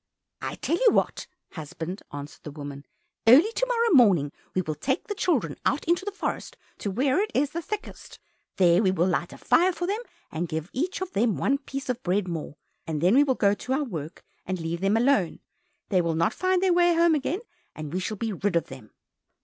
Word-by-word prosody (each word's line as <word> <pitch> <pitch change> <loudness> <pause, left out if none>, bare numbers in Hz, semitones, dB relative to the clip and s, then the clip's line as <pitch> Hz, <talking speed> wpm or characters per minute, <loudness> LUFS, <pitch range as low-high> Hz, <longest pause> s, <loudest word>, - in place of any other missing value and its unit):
"I'll - - -4
tell 335 - -1
you - - +3
what, - - 0 0.2
husband," 165 +4 -6
answered 145 0 -8
the - - -8
woman, 145 -1 -8 0.4
"Early 300 - +7
to - - 0
morrow 470 -2 +2
morning 195 - +5 0.2
we 185 - +1
will 155 - -3
take 265 - -2
the 415 - -3
children 255 - 0
out 285 - 0
into 345 +3 +1
the 410 - -2
forest 400 - -4 0.2
to 205 - -3
where 260 - +1
it 425 - -1
is 285 +1 +2
the 335 - -3
thickest, 425 +5 -7 0.4
there 180 -1 +4
we 195 - +3
will 175 -2 +2
light 175 -1 -1
a - - -10
fire 360 +2 +3
for 350 0 -4
them, 405 +4 -1 0.3
and 170 +2 -2
give 160 +2 -4
each 360 +9 -2
of 375 -1 -3
them 225 0 +1
one 275 +1 +1
piece 275 -1 -6
of 250 -1 -2
bread 185 0 0
more, 160 -4 -5 0.3
and 155 -2 -2
then 180 +6 +3
we 280 +3 +6
will 265 -3 +1
go 200 -3 +3
to 250 +5 -3
our 290 +3 +1
work 165 - -7 0.2
and 185 0 -3
leave 165 +1 -3
them 195 +3 +2
alone. 230 -8 +2 0.5
They 185 -3 +3
will 165 -1 -1
not 170 +7 +1
find 370 0 +1
the 375 - +4
way 350 -1 +4
home 335 0 +4
again, 310 +6 -1 0.3
and 155 0 -7
we 185 - 0
shall 210 +3 -3
be 225 +1 -2
rid 195 0 -1
of 170 - 0
them." 130 -5 -11
215 Hz, 220 wpm, -26 LUFS, -, 0.5 s, Early